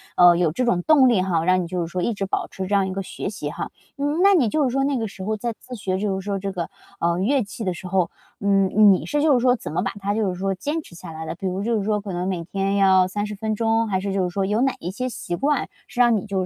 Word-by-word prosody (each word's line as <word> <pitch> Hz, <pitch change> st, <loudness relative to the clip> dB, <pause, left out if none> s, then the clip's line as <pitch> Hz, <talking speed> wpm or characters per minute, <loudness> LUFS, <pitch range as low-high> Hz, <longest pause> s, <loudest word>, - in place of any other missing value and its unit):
呃， 175 Hz, -1 st, +7 dB
有 165 Hz, -3 st, +1 dB
这 255 Hz, -, 0 dB
种 185 Hz, -8 st, +2 dB
动 275 Hz, -5 st, +6 dB
力 205 Hz, -6 st, +3 dB
哈， 170 Hz, -4 st, 0 dB
让 185 Hz, +1 st, +3 dB
你 175 Hz, -, -4 dB
就 180 Hz, 0 st, -2 dB
是 165 Hz, -, -2 dB
说 180 Hz, -, -2 dB
一 235 Hz, -, 0 dB
直 200 Hz, -1 st, -3 dB
保 195 Hz, -, -2 dB
持 190 Hz, -1 st, -6 dB
这 205 Hz, -, -3 dB
样 195 Hz, -1 st, +2 dB
一 185 Hz, -, -4 dB
个 195 Hz, 0 st, -3 dB
学 190 Hz, -, -5 dB
习 170 Hz, -8 st, -5 dB
哈。 -, -, -5 dB, 0.3 s
嗯， 290 Hz, +5 st, 0 dB
那 400 Hz, 0 st, +7 dB
你 300 Hz, -11 st, +4 dB
就 300 Hz, +8 st, +1 dB
是 265 Hz, -, +2 dB
说 270 Hz, +2 st, +1 dB
那 280 Hz, -1 st, 0 dB
个 225 Hz, -3 st, -2 dB
时 190 Hz, -1 st, -8 dB
候 215 Hz, +1 st, 0 dB
在 230 Hz, +2 st, -3 dB
自 255 Hz, -, -9 dB
学， 190 Hz, -4 st, -2 dB
就 195 Hz, -1 st, -1 dB
是 -, -, -8 dB
说 200 Hz, 0 st, -2 dB
这 195 Hz, +1 st, -3 dB
个， 175 Hz, -3 st, -4 dB, 0.3 s
啊， 170 Hz, 0 st, +1 dB
乐 245 Hz, +7 st, +2 dB
器 215 Hz, +3 st, -7 dB
的 185 Hz, -3 st, -1 dB
时 180 Hz, +2 st, -8 dB
候， 185 Hz, -2 st, +1 dB, 0.3 s
呃， 200 Hz, -, -3 dB, 0.2 s
你 200 Hz, -1 st, +5 dB
是 295 Hz, 0 st, 0 dB
就 310 Hz, -2 st, +5 dB
是 250 Hz, -, +4 dB
说 250 Hz, +1 st, +4 dB
怎 230 Hz, -, -7 dB
么 180 Hz, -, +1 dB
把 195 Hz, -, -1 dB
它 200 Hz, +1 st, -1 dB
就 215 Hz, -2 st, 0 dB
是 180 Hz, -1 st, -5 dB
说 195 Hz, 0 st, 0 dB
坚 295 Hz, -, -3 dB
持 175 Hz, -, -16 dB
下 170 Hz, 0 st, -9 dB
来 160 Hz, 0 st, -7 dB
的？ 160 Hz, -, -4 dB
比 190 Hz, +3 st, -4 dB
如 185 Hz, +2 st, -2 dB
就 230 Hz, 0 st, +1 dB
是 -, -, -2 dB
说 210 Hz, 0 st, 0 dB
可 200 Hz, -2 st, -6 dB
能 180 Hz, +1 st, -2 dB
每 180 Hz, -3 st, -2 dB
天 195 Hz, +3 st, -1 dB
要 190 Hz, -2 st, +5 dB
30 205 Hz, +2 st, -3 dB
分 220 Hz, +1 st, -2 dB
钟， 225 Hz, +1 st, +1 dB
还 190 Hz, -2 st, 0 dB
是 195 Hz, 0 st, -3 dB
就 195 Hz, -1 st, +1 dB
是 180 Hz, -, 0 dB
说 195 Hz, +2 st, -1 dB
有 210 Hz, +4 st, +1 dB
哪 265 Hz, 0 st, +2 dB
一 175 Hz, -, -4 dB
些 255 Hz, +6 st, -3 dB
习 175 Hz, -6 st, -4 dB
惯 285 Hz, +7 st, 0 dB, 0.2 s
是 245 Hz, -, -8 dB
让 240 Hz, -2 st, +5 dB
你 200 Hz, -, -2 dB
就 190 Hz, -2 st, -1 dB
200 Hz, 335 characters per minute, -23 LUFS, 185-230 Hz, 0.3 s, 呃